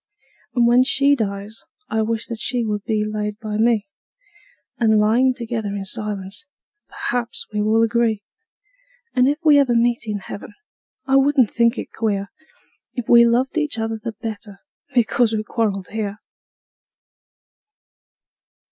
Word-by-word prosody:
And 240 -1 +4
when 240 +1 +5
she 280 +2 +3
dies 205 -2 -4 0.2
I 220 - 0
wish 225 0 -1
that 230 -2 -6
she 245 0 0
would 210 -2 -2
be 215 -1 0
laid 210 -1 -3
by 215 -1 -4
me, 225 -2 +2 0.9
And, 220 -2 +4
lyin' 240 +5 +3
together 225 -4 -3
in 195 -1 -4
silence, 210 +4 -4 0.4
perhaps 240 -1 -3
we 210 - 0
will 220 +2 +3
agree; 230 -2 +1 0.9
And, 250 0 +4
if 290 - 0
ever 285 -5 +5
we - - +5
meet 235 -1 0
in 210 -1 -2
heaven, 200 +1 -9 0.5
I 270 0 +3
wouldn't 270 -4 +3
think 235 +1 +2
it - - -6
queer 205 -3 -1 0.7
If 245 -3 -4
we 235 0 +8
loved 255 +6 +1
each 300 -6 -2
other 225 0 -2
the 230 - -4
better 215 -2 -7 0.4
because 235 -1 +3
we 215 -1 -1
quarreled 205 -4 -2
here. 210 -2 -3
225 Hz, 145 wpm, -21 LUFS, 210-240 Hz, 0.9 s, we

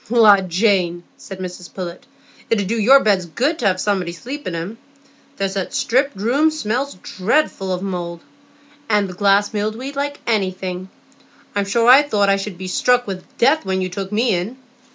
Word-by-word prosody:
"La, 220 -4 +7
Jane," 180 -2 +1
said 195 - -10
Mrs 180 -1 -7
Pullet, 180 +1 -7 0.4
"it 230 - +2
'ud 200 - -1
do 220 +5 -1
your 265 +6 +6
beds 195 -4 +2
good 275 - -1
to 235 - +1
have 185 -1 +1
somebody 190 -4 0
to 170 - -12
sleep 285 +4 -7
in 175 - -3
'em. 185 +8 -5 0.6
There's 195 -1 -1
that 195 -2 -3
striped 260 +1 +1
room 255 +10 +2
smells 275 -3 -2
dreadful 190 -4 0
mouldy, 175 -3 -4 0.7
and 210 -2 +2
the 185 - -8
glass 200 +2 +2
mildewed 220 +7 -3
like 285 +1 -3
anything. 185 -4 -2 0.7
I'm 200 -1 +1
sure 230 +4 +1
I 260 +3 +9
thought 210 -9 +1
I 195 - +4
should 195 -2 -6
be 185 +1 -6
struck 245 +6 +2
with 190 -2 -8
death 280 +6 +3
when 190 0 -1
you 185 0 -2
took 195 +2 -5
me 225 +2 +2
in." 185 +8 -3
200 Hz, 185 wpm, -20 LUFS, 185-240 Hz, 0.7 s, I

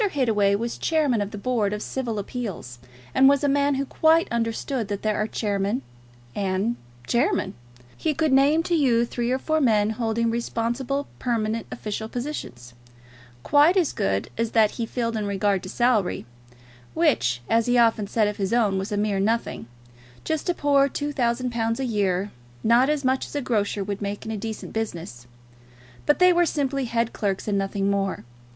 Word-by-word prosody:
Hittaway 215 - +2
was 230 +3 -3
Chairman 295 -9 +1
of 200 - -2
the 210 - -8
Board 215 -2 0
of 210 - -4
Civil 240 -5 -3
Appeals, 200 - -5 0.3
and 270 +1 +6
was 280 0 +2
a - - +3
man 285 0 +2
who 275 +1 -1
quite 320 +4 +3
understood 230 +1 -2
that 205 -1 -4
there 215 -1 +1
are 215 - 0
chairmen 205 +3 -1 0.5
and 195 - -1 0.3
chairmen. 260 - +1 0.4
He 310 -2 -1
could 315 -3 +1
name 285 +4 +4
to 345 - -2
you 250 -7 +3
three 240 0 -3
or 255 - +2
four 315 +3 0
men 215 -5 +3
holding 230 0 0
responsible 240 +4 -2
permanent 225 -2 -1
official 220 +1 -5
positions 225 - -6 0.7
quite 300 +6 +5
as 345 -6 +2
good 95 0 -1
as 230 -1 -1
that 220 -2 +4
he 230 -2 -4
filled 230 -1 -2
in 210 -2 -2
regard 200 -1 +1
to 185 - -8
salary, 225 - +1 0.7
which, 135 - +2
as 230 0 +2
he 245 0 +3
often 225 -3 +3
said 215 0 +1
of 210 - -3
his 195 +1 -1
own, 210 -5 +2
was 195 +2 -5
a 205 - -1
mere 205 -1 0
nothing, 220 - -1 0.6
just 315 +2 -2
a 350 - +1
poor 280 -2 +3
two 290 +2 -3
thousand 245 -1 0
pounds 230 0 -1
a 265 - -1
year, 200 -4 0 0.3
not 240 +4 +4
as 300 -3 0
much 260 +1 +1
as - - -11
a 290 - 0
grocer 205 -4 0
would 200 +1 -4
make 200 +1 -4
in 220 - -4
a - - -2
decent 220 +1 -6
business, 170 - -5 0.8
but 295 - +4
they 365 0 +6
were 350 0 +4
simply 275 -3 -1
head 230 0 -1
clerks 195 -1 -2
and 200 -1 +1
nothing 195 0 -1
more. 195 -1 -1
230 Hz, 185 wpm, -24 LUFS, 205-270 Hz, 0.8 s, and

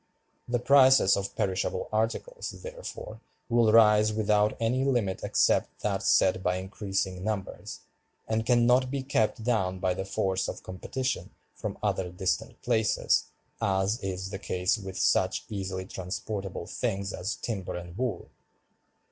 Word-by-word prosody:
The 120 - +1
prices 130 -4 +6
of 100 0 -4
perishable 95 -3 -1
articles, 115 - -1
therefore, - - -8 0.3
will 115 -2 +4
rise 105 -1 +6
without 105 -1 +2
any 120 +3 +1
limit 120 -9 +1
except - - +1
that - - -1
set - - +3
by 90 0 +1
increasing 95 -1 -3
numbers, 105 -2 -4 0.5
and 110 0 0
can 120 +1 +3
not 125 +1 +4
be 135 0 -2
kept 115 -4 0
down 95 -6 +1
by 90 0 0
the 95 - -3
force 95 0 -1
of - - -6
competition 130 +8 -3 0.2
from - - -5
other 90 -2 0
distant 90 +1 -2
places, 110 -3 +2 0.4
as 95 +3 +1
is 95 0 -4
the 95 - -5
case 90 0 0
with 95 -4 -7
such - - +2
easily 95 -2 -4
transportable 95 0 -5
things 100 -4 -2
as 90 +1 -3
timber 100 -1 -4
and 85 0 -7
wool. 120 -2 -3
105 Hz, 140 wpm, -28 LUFS, 95-120 Hz, 0.5 s, prices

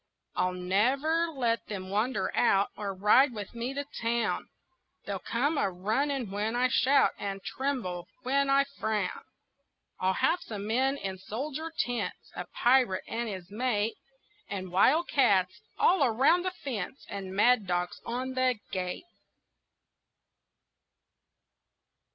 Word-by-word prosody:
I'll 180 0 +1
never 260 - +2
let 245 -7 -1
them 190 -2 -6
wander 220 +6 0
out 200 -4 +3
Or 205 -2 -3
ride 210 +8 +4
with 205 -2 -6
me 240 +3 -4
to 285 - -2 0.2
town; 235 0 0 0.6
They'll - - -3
come 285 +6 0
a - - +2
running 220 +6 -1
when 210 +3 -1
I 250 +1 +3
shout 265 +2 +4
And 195 -1 -4
tremble 245 -11 -3 0.2
when 275 +2 +1
I 275 0 +5
frown. 220 -8 -2 0.8
I'll 185 0 +1
have 355 - +2
some 205 -2 -6
men 260 +5 +1
in 190 -6 -5
soldier 280 - -5
tents, 245 -1 -2
A - - -5
pirate 245 -6 +3
and 235 0 -3
his 185 -2 -7
mate, 225 -1 0 0.6
And 185 -2 -5
wildcats 210 - +3 0.2
all 355 -4 +4
around 275 +9 +3
the 370 - 0
fence, 260 -1 -4
And 195 -2 -6
mad 225 0 +4
dogs 175 0 -2
on 255 +2 -3
the 255 -1 +2 0.2
gate. 180 - -3
230 Hz, 130 wpm, -29 LUFS, 195-270 Hz, 0.8 s, I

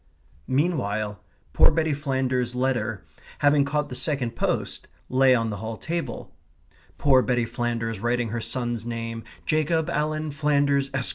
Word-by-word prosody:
Meanwhile, 110 - 0 0.3
poor - - +6
Betty 160 -2 +1
Flanders's 130 -3 -1
letter, 120 -5 -1 0.3
having 145 0 +4
caught 145 +1 -1
the 135 - -8
second 125 -4 0
post, - - -2 0.2
lay 130 0 +5
on 115 -2 0
the 100 - -4
hall 110 +2 -5
table 170 0 -4 0.6
poor 135 -3 +5
Betty 120 -2 +1
Flanders 115 -2 -2
writing 120 +1 0
her 115 +2 -3
son's 120 0 -2
name, 115 -1 -4 0.2
Jacob 155 +1 +1
Alan 155 0 -1
Flanders, 140 -1 +2
Esq. 130 -1 0
130 Hz, 140 wpm, -25 LUFS, 115-145 Hz, 0.6 s, poor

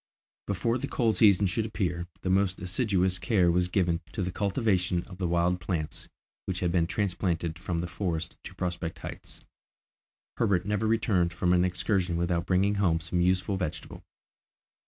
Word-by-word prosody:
Before 115 +5 0
the - - -3
cold 110 -5 +1
season 100 -2 +6
should 110 +4 0
appear 90 -5 -2
the 90 - -1
most 95 -1 +2
assiduous 95 -1 0
care 95 -5 +3
was 90 +1 +2
given 90 -2 +1
to 100 - -2
the 90 - -2
cultivation 95 -3 0
of 95 -1 -12
the 90 - 0
wild 85 +1 +1
plants 80 -3 -4 0.4
which 95 -2 -2
had 90 -2 +1
been 85 -2 +2
transplanted 90 -3 -1
from 90 -2 -3
the 85 +1 -2
forest 85 -2 -3
to 95 - -9
Prospect 90 -2 -3
Heights. - - -9 1.0
Herbert 100 -5 +2
never 105 +1 0
returned 100 -6 +2
from 90 +1 +1
an 90 0 +4
excursion 90 -1 0
without 85 0 0
bringing 95 +2 +3
home 85 -4 +3
some 85 +2 -1
useful 90 +2 +1
vegetable. 85 -3 -5
90 Hz, 165 wpm, -28 LUFS, 85-100 Hz, 1.0 s, season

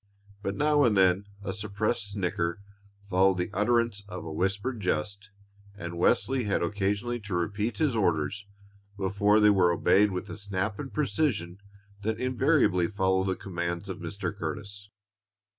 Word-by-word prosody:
But 100 -1 -2
now 150 0 +3
and 110 -5 +3
then 95 +1 +3 0.2
a 95 -2 -3
suppressed 105 +1 -2
snicker 90 -2 -1 0.5
followed 95 0 +3
the 90 +3 -2
utterance 115 0 +1
of 90 -3 -6
a 80 - -5
whispered 100 +8 -1
jest, 100 +3 -2 0.5
and 85 -3 -6
Wesley 125 +5 +2
had 100 - 0
occasionally 100 +6 -1
to 105 -4 -5
repeat 105 +6 -1
his 150 -7 +1
orders 100 0 0 0.5
before 100 +2 +3
they 105 0 +6
were 90 -3 +4
obeyed 100 +4 +4
with 90 -2 -4
the - - -8
snap 100 +1 -3
and 135 -2 -5
precision 130 - -1 0.4
that 110 +2 -2
invariably 130 - +2
followed 95 -1 +1
the 95 - 0
commands 85 0 -4
of 95 - -5
Mr. 90 +3 -4
Curtis. 100 +3 -6
100 Hz, 150 wpm, -28 LUFS, 90-110 Hz, 0.5 s, they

